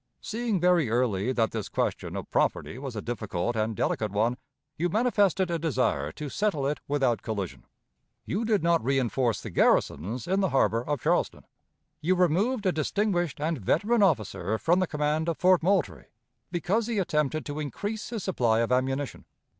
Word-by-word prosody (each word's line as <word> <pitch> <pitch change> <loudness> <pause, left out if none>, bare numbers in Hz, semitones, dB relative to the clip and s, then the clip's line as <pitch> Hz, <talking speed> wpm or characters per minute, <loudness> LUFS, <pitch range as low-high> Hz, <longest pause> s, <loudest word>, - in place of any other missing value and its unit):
Seeing 225 -3 -2
very 175 -6 +3
early 115 -2 +1
that 115 -3 +1
this 110 -3 -4
question - - -2
of - - -6
property 125 - 0
was 135 -3 -6
a 105 - -4
difficult 115 -2 -3
and 110 0 -1
delicate 105 +1 -1
one, 110 +4 +1 0.4
you 175 +3 0
manifested 200 -4 +2
a 170 - 0
desire 125 - 0
to 150 - -6
settle 155 -3 -1
it 145 +1 -1
without 135 -5 +1
collision. 100 -5 -5 0.6
You 205 +6 -1
did 215 -5 +1
not 170 -1 +3
reënforce 125 -3 0
the - - -6
garrisons 105 - +1
in 190 +2 +1
the 190 -2 +2
harbor 115 -4 +2
of 145 -2 -2
Charleston. - - 0 0.6
You 180 +4 +2
removed 195 +7 +1
a 185 - +4
distinguished 175 -1 -1
and 155 0 -1
veteran 210 - +2
officer 110 - +1
from 175 +9 +2
the 185 - +1
command 150 +2 0
of 165 - -2
Fort 185 -1 +4
Moultrie, 160 - 0 0.5
because 190 +6 0
he 235 -2 -2
attempted 155 -5 0
to 145 +1 -5
increase 205 - -4
his 225 -5 -4
supply 115 - +1
of 115 - -1
ammunition. 135 0 -1
150 Hz, 170 wpm, -27 LUFS, 120-185 Hz, 0.6 s, a